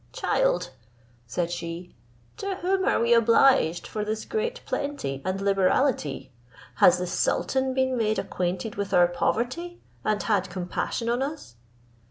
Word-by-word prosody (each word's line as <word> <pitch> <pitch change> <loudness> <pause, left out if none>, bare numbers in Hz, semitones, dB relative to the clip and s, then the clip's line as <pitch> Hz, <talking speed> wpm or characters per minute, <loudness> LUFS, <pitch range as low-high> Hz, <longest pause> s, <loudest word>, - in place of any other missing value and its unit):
"Child," - - 0 0.6
said 170 +8 -2
she, 170 +1 -6 0.4
"to 395 -1 -3
whom 380 +1 0
are - - +2
we 235 +1 +3
obliged 230 -6 +4
for 210 - -4
this 215 +1 -3
great 460 +2 -2
plenty 280 - -3
and 185 +1 -2
liberality? 195 - +1 0.5
Has 180 - +6
the 180 - -2
sultan 260 +8 0
been 260 -1 +1
made 220 -2 +1
acquainted 180 +4 -3
with 200 -1 -1
our 175 -1 +6
poverty, 250 - -2 0.2
and 215 -1 0
had 200 -4 +1
compassion 185 +5 -3
on 240 +2 +1
us?" 285 - -5
215 Hz, 140 wpm, -26 LUFS, 180-270 Hz, 0.6 s, Has